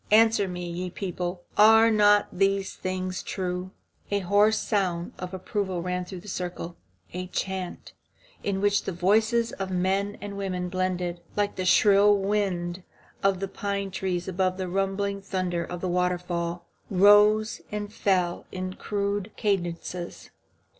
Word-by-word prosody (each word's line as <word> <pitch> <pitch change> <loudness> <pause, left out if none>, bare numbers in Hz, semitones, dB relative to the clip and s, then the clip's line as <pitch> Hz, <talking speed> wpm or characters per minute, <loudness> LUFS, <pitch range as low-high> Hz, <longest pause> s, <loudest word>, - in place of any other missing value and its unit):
Answer 220 -1 +5
me, 180 -1 -5
ye 180 +1 -4
people, 180 -1 -4 0.2
are 225 +2 +7
not 205 -1 +5
these 195 +1 +1
things 185 0 -3
true?" 180 -1 -3 0.4
A 200 0 0
hoarse 205 +4 +4
sound 185 -6 -1
of 180 0 -5
approval 190 -1 -3
ran 180 0 -2
through 180 -1 -8
the 210 - -14
circle. 175 -2 -5 0.4
A 180 +1 -4
chant, 190 0 -4 0.5
in 195 -1 -1
which 205 0 +2
the - - -2
voices 220 +6 +2
of 195 -1 -4
the 185 - -2
men 195 +3 0
and 200 0 -6
women 180 -2 -2
blended, 180 -2 -2
like 205 -1 0
the 185 - -3
shrill 205 +2 +6
wind 190 -3 -1 0.4
in 195 -1 +3
the 195 +1 -3
pine 200 0 -3
trees 185 -2 -2
above 185 0 0
the 185 -1 -3
rumbling 195 +2 -1
thunder 185 -3 -2
of 175 +1 -7
a - - 0
waterfall, 175 -1 -1 0.2
rose 205 +3 +5
and 210 0 -4
fell 180 -5 0
in 185 0 -4
rude 200 0 -1
cadences. 175 -3 -3
190 Hz, 145 wpm, -26 LUFS, 180-205 Hz, 0.5 s, are